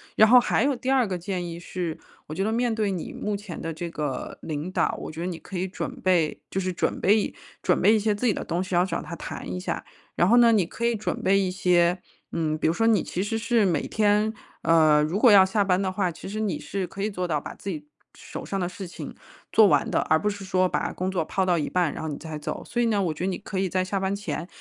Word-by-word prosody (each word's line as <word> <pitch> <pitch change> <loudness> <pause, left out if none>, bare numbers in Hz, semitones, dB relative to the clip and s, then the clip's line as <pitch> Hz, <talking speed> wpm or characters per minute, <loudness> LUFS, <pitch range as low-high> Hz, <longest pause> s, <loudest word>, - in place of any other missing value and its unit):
然 220 - +7
后 250 +3 +8
还 - - +1
有 280 0 +2
第 255 +2 -4
2 265 -2 +4
个 185 -2 -2
建 180 0 -3
议 170 0 -6
是， 175 -2 -4 0.3
我 155 - -6
觉 190 - -1
得 215 - 0
面 235 0 +1
对 215 -2 0
你 180 -4 -5
目 210 -1 -3
前 200 -4 -7
的 165 0 -4
这 170 +2 -5
个 150 -4 -4
领 155 +3 -4
导， - - 0
我 - - -6
觉 155 - -9
得 175 - -2
你 175 -3 -4
可 190 - -8
以 185 - -1
准 185 - -5
备 175 -5 +1
就 190 - -2
是 185 -1 -2
准 - - -1
备 205 - +4
一 210 - -2 0.3
准 - - +2
备 215 - +6
一 220 - +3
些 210 0 +1
自 205 - -3
己 220 - +4
的 - - -4
东 175 +2 -1
西， 185 -1 -7
然 175 +1 +4
后 190 - -3
找 170 - -2
他 170 - -7
谈 160 - -7
一 90 - -3
下。 - - -3 0.3
然 175 - +3
后 235 +5 +5
呢， 235 -1 +7
你 205 -5 +3
可 230 +7 -4
以 235 -1 +2
准 215 - -3
备 195 +1 +3
一 190 -2 0
些 180 -1 +3 0.3
嗯， 155 -2 -1
比 - - -3
如 160 - +2
说 225 +5 +1
你 225 - +4
其 180 - -3
实 225 +3 -1
是 230 -1 +2
每 170 -6 +1
天， 210 0 +2 0.3
呃， 155 -2 +5
如 165 +7 -1
果 240 0 +7
要 195 -2 +8
下 205 +1 +1
班 185 -2 +2
的 190 -1 -1
话， 185 -2 0
其 165 - -10
实 210 +3 -4
你 215 -3 -1
是 195 -3 -4
可 195 +3 -6
以 215 - -1
做 180 -2 -3
到 155 -3 0
把 - - -8
自 200 - -7
己 155 -5 -5 0.3
手 - - -8
上 195 - -3
的 175 - 0
事 180 +1 -7
情 - - -8 0.4
做 220 -2 +7
完 - - +3
的， - - +2
而 160 - +3
不 210 - -2
是 200 -1 -3
说 185 -1 +2
把 - - -1
工 185 +1 -3
作 175 -4 0
抛 190 +4 -1
到 175 -3 +2
一 150 - -2
半， 180 -4 +1
然 - - -6
后 160 - -3
你 145 - -4
再 160 -2 -7
走。 150 - -5
所 240 - -1
以 235 - +3
呢， 210 -3 +1
我 165 -4 0
觉 165 - -6
得 - - +1
你 185 - -2
可 195 -2 -5
以 190 - 0
在 185 +1 +1
下 195 +1 -1
班 190 +1 -1
前， 200 -4 -4
185 Hz, 310 characters per minute, -25 LUFS, 170-210 Hz, 0.4 s, 后